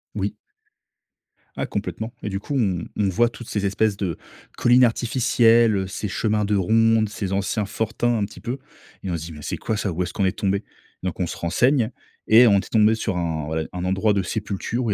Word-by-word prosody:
Oui. -, -, -2 dB, 1.2 s
Ah -, -, -1 dB
complètement. 110 Hz, +2 st, -4 dB
Et -, -, -2 dB
du 95 Hz, -1 st, -3 dB
coup, 140 Hz, +7 st, -5 dB
on 95 Hz, -8 st, 0 dB
on 100 Hz, -2 st, +2 dB
voit 120 Hz, +6 st, +3 dB
toutes 120 Hz, 0 st, -9 dB
ces 105 Hz, -1 st, -1 dB
espèces 100 Hz, +1 st, +1 dB
de 90 Hz, -5 st, -2 dB, 0.4 s
collines 125 Hz, +1 st, +5 dB
artificielles, 115 Hz, -3 st, +3 dB
ces 105 Hz, -, -4 dB
chemins 105 Hz, +1 st, 0 dB
de 105 Hz, +1 st, +1 dB
ronde, 110 Hz, +3 st, +3 dB
ces 100 Hz, -2 st, -4 dB
anciens 100 Hz, +2 st, 0 dB
fortins 115 Hz, +3 st, -1 dB
un 105 Hz, -, 0 dB
petit 100 Hz, -2 st, -12 dB
peu. 120 Hz, +7 st, -4 dB, 0.5 s
Et 95 Hz, -, -3 dB
on 85 Hz, -, -1 dB
se 80 Hz, -, -7 dB
dit: 85 Hz, -, -8 dB
«Mais 75 Hz, -, -10 dB
c'est -, -, -4 dB
quoi 110 Hz, -, -2 dB
ça, 105 Hz, -2 st, -2 dB
où 85 Hz, +2 st, -3 dB
est-ce 90 Hz, 0 st, -6 dB
qu'on 100 Hz, -, -1 dB
est 95 Hz, -, +2 dB
tombé?» 100 Hz, +1 st, -1 dB, 0.4 s
Donc, 90 Hz, -1 st, -3 dB
on 90 Hz, -, 0 dB
se -, -, -5 dB
renseigne 120 Hz, -, +2 dB, 0.4 s
et 115 Hz, +3 st, +8 dB
on 100 Hz, -2 st, +5 dB
était -, -, -7 dB
tombé 110 Hz, 0 st, +4 dB
sur 110 Hz, -4 st, -2 dB
un, 80 Hz, -3 st, -2 dB
voilà, 80 Hz, +1 st, -1 dB
un 90 Hz, 0 st, -4 dB
endroit 95 Hz, +3 st, +2 dB
de 100 Hz, -, +1 dB
sépulture 105 Hz, +4 st, -3 dB
où 110 Hz, -, 0 dB
il -, -, +2 dB
105 Hz, 220 wpm, -23 LUFS, 95-115 Hz, 1.2 s, et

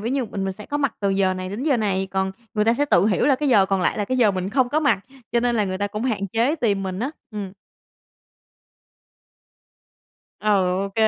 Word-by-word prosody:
ví 225 Hz, +3 st, -2 dB
như 270 Hz, -1 st, 0 dB
mình 200 Hz, -3 st, -4 dB
mình 190 Hz, -, -2 dB
sẽ 210 Hz, +3 st, -11 dB
có 290 Hz, -, -2 dB
mặt 280 Hz, -5 st, 0 dB
từ 200 Hz, -1 st, +1 dB
giờ 195 Hz, -1 st, +2 dB
này 185 Hz, 0 st, -5 dB
đến 210 Hz, +7 st, -5 dB
giờ 285 Hz, -4 st, +2 dB
này, 195 Hz, -3 st, -1 dB
còn 190 Hz, 0 st, -1 dB, 0.2 s
người 210 Hz, 0 st, +2 dB
ta 230 Hz, -, +3 dB
sẽ 290 Hz, +4 st, +1 dB
tự 190 Hz, -7 st, +3 dB
hiểu 220 Hz, +5 st, +2 dB
là 275 Hz, -, +5 dB
cái 290 Hz, +1 st, -1 dB
giờ 200 Hz, -6 st, +5 dB
còn 195 Hz, -1 st, 0 dB
lại 180 Hz, -, 0 dB
là 205 Hz, -, 0 dB
cái 255 Hz, -, -1 dB
giờ 220 Hz, -4 st, +5 dB
mình 190 Hz, 0 st, -3 dB
không 255 Hz, +1 st, +2 dB
có 305 Hz, +3 st, +1 dB
mặt, 285 Hz, -10 st, +2 dB, 0.3 s
cho 235 Hz, -, +3 dB
nên 240 Hz, -1 st, +1 dB
là 210 Hz, -, +2 dB
người 185 Hz, -1 st, -3 dB
ta 205 Hz, -, 0 dB
cũng 210 Hz, +2 st, -5 dB
hạn 210 Hz, -6 st, -1 dB
chế 230 Hz, -, +1 dB
tìm 205 Hz, -9 st, 0 dB
mình 190 Hz, -1 st, -4 dB
á. 260 Hz, +4 st, -1 dB, 0.2 s
Ừm. 205 Hz, -3 st, -6 dB, 2.9 s
Ừ, 215 Hz, -, -2 dB, 0.4 s
OK. 195 Hz, -, -7 dB
210 Hz, 245 wpm, -23 LUFS, 195-245 Hz, 2.9 s, là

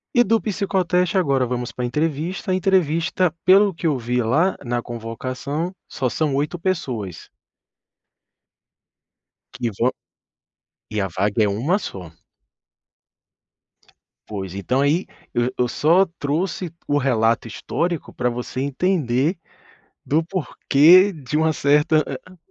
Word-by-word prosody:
E 240 Hz, -, +6 dB
do 225 Hz, 0 st, +2 dB
psicoteste 185 Hz, -2 st, 0 dB
agora 135 Hz, -7 st, +2 dB
vamos 120 Hz, 0 st, -3 dB
pra 125 Hz, -, -4 dB
entrevista, 155 Hz, +7 st, -2 dB
a -, -, +3 dB
entrevista 180 Hz, -2 st, +1 dB
pelo 195 Hz, +2 st, +6 dB
que 170 Hz, -, -8 dB
eu 150 Hz, -4 st, +3 dB
vi 125 Hz, 0 st, -1 dB
lá 155 Hz, +12 st, +2 dB
na 120 Hz, 0 st, -1 dB
convocação 130 Hz, +8 st, -4 dB, 0.2 s
só 130 Hz, -, -2 dB
são 150 Hz, +2 st, -1 dB
8 150 Hz, +5 st, -1 dB
pessoas. 130 Hz, -, -3 dB, 2.3 s
Que 120 Hz, -2 st, -2 dB
vão 125 Hz, +2 st, +3 dB, 1.0 s
e 110 Hz, -1 st, -2 dB
a 95 Hz, -, -1 dB
vaga 100 Hz, +5 st, 0 dB
é -, -, +2 dB
1 130 Hz, -, +1 dB
só. 90 Hz, -, -7 dB, 2.2 s
Pois. 95 Hz, -4 st, -5 dB
Então 125 Hz, +7 st, 0 dB
aí, 150 Hz, +6 st, +2 dB, 0.3 s
eu 120 Hz, +1 st, +1 dB
eu 125 Hz, -, +2 dB
só 170 Hz, +9 st, +3 dB
trouxe 165 Hz, +4 st, -2 dB, 0.2 s
o 145 Hz, -, +2 dB
relato 115 Hz, -4 st, +1 dB
histórico 170 Hz, +8 st, -3 dB
para 125 Hz, -1 st, 0 dB
você 125 Hz, +1 st, -5 dB
entender 145 Hz, 0 st, 0 dB, 0.7 s
do 155 Hz, +3 st, +2 dB
porquê 180 Hz, +1 st, +4 dB
de 150 Hz, -1 st, -3 dB
uma 160 Hz, 0 st, +2 dB
certa 150 Hz, +2 st, +3 dB
a 145 Hz, +4 st, -6 dB
an -, -, -15 dB
145 Hz, 130 wpm, -22 LUFS, 120-180 Hz, 2.3 s, E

